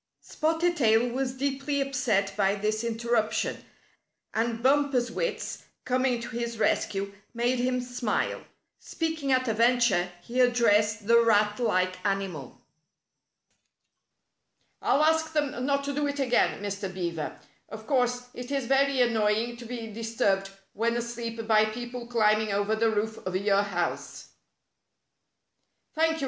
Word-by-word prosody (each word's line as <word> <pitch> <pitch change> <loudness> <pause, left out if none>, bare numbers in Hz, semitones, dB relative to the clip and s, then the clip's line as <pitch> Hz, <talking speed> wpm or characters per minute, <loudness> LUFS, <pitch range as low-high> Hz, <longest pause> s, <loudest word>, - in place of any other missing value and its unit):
Spotted 330 +2 0
Tail 225 -2 +4
was 260 +1 -3
deeply 280 +1 -1
upset 250 -8 0
by 195 -1 +2
this 215 +2 -1
inter 235 0 -4
ruption, 220 -2 +1 0.8
and 230 +1 -1
Bumper's 270 -3 +2
wits, - - -3 0.2
coming 255 -1 +1
to 235 - -6
his 235 -1 -4
rescue, 200 -2 0 0.2
made 240 +2 +1
him 250 +1 +1
smile. 245 -3 -2 0.4
Speaking 320 -4 -3
at 255 0 +2
a 225 - +1
venture, 230 -6 +3
he 250 +5 0
ad 245 -1 +4
dressed 210 -3 +2
the 235 +2 +6
rat 210 -1 +3
like 185 -5 0
animal. 195 -9 -3 1.5
" - - -48
I'll 295 - +3
ask 320 0 +2
them 285 -4 -1
not 280 0 +1
to 280 0 -3
do 290 +1 0
it 285 0 -3
again, 250 -5 +1
Mr. 200 -1 -4
Beaver. 170 -4 -4 0.3
Of 220 +1 -9
course, 245 -2 +1
it 245 0 -8
is 275 -2 -1
very 270 +1 +3
annoying 225 0 +1
to 235 - -10
be 235 -1 -5
disturbed 205 -3 0 0.2
when 235 +2 0
asleep 230 -1 -4
by 215 -1 +4
people 240 +2 -6
climbing 215 -2 +2
over 205 +2 +1
the 225 +1 +2
roof 220 +1 -2
of 185 0 -4
your 200 +1 +3
house." 180 -4 -3 1.6
"Thank 320 +1 +2
you!" 320 - -5
235 Hz, 145 wpm, -27 LUFS, 210-255 Hz, 1.6 s, the